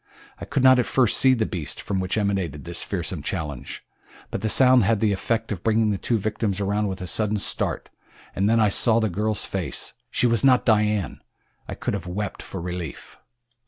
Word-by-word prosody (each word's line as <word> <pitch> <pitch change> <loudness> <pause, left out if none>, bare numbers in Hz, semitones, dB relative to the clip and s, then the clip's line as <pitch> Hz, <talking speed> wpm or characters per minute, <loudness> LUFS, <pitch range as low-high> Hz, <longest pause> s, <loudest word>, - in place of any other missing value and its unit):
I - - -6
could 140 -2 -1
not 130 -1 +7
at 125 - +1
first 125 -5 +2
see 130 -1 +5
the 110 -2 0
beast 80 -8 -5
from 95 -2 -3
which 95 +2 -2
emanated 95 -8 -2
this 85 0 -4
fearsome 90 -4 -3
challenge, 75 -5 -5 0.5
but - - -3
the 110 - -1
sound 130 0 +5
had 110 +1 +2
the 110 -1 +2
effect 115 +3 -2
of 95 -5 -4
bringing 110 -1 +2
the 100 - -2
two 120 - 0
victims 105 -1 -2
around 105 +1 0
with 95 -1 -5
a - - -4
sudden 105 +4 0
start, - - 0 0.5
and 100 +2 +1
then 115 0 +3
I 110 -2 +4
saw 115 +3 +3
the 110 -2 0
girl's 105 +3 -2
face - - -4 0.2
she - - 0
was 115 -2 +2
not 130 -2 +4
Dian! 105 - +1 0.5
I - - -5
could - - -3
have 95 -3 -4
wept 100 +3 -4
for 95 - -7
relief. 90 -2 -7
105 Hz, 205 wpm, -24 LUFS, 95-115 Hz, 0.5 s, not